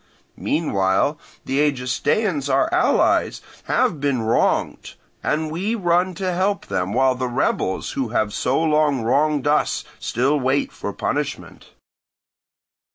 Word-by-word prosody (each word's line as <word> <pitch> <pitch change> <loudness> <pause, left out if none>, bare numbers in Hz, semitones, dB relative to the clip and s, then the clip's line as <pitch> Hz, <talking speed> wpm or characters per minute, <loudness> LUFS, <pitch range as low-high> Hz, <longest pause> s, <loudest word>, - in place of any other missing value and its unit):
Meanwhile 120 - +1 0.3
the 135 +1 -1
Egestaeans, 145 - 0
our 135 0 +2
allies, - - +2 0.3
have 150 - +1
been 140 -5 0
wronged, 110 +1 0 0.3
and 155 0 -1
we 195 +8 -1
run 180 -2 +1
to 185 -1 -2
help 200 +3 0
them, 90 +1 -2
while 130 +3 +3
the 125 0 -3
rebels 120 -6 -1
who 135 -3 -2
have 110 -2 0
so 130 - 0
long 150 -5 +2
wronged 145 +4 +1
us 150 +1 +1 0.2
still 135 +5 0
wait 135 +2 0
for - - -5
punishment. - - -4
145 Hz, 125 wpm, -21 LUFS, 125-160 Hz, 0.3 s, while